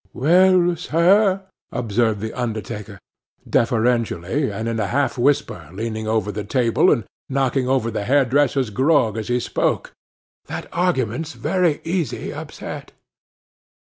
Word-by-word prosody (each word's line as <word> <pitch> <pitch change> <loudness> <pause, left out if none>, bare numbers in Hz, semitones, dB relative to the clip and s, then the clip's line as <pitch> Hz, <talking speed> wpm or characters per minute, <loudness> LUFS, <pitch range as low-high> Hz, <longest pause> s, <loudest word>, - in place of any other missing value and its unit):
'Well, 175 +4 +4
sir,' 190 +4 +3 0.3
observed 110 -2 0
the 110 0 -4
undertaker, 110 -3 -5 0.5
deferentially, 115 - +1
and 115 +1 -4
in 115 -1 -2
a 105 - 0
half 140 +5 0
whisper, 120 - 0
leaning 110 +2 -4
over 110 -2 0
the 105 +1 -4
table, 115 +2 +2
and 115 - +1 0.2
knocking 135 -1 0
over 125 -4 +1
the 105 -2 -3
hairdresser's 135 -1 +2
grog 130 -2 +2
as 110 -1 -4
he 125 0 +1
spoke, - - -1 0.5
'that - - -6
argument's 160 - -1
very 165 +6 0
easy 170 -2 -2
upset. - - -8
125 Hz, 125 wpm, -21 LUFS, 110-145 Hz, 0.5 s, Well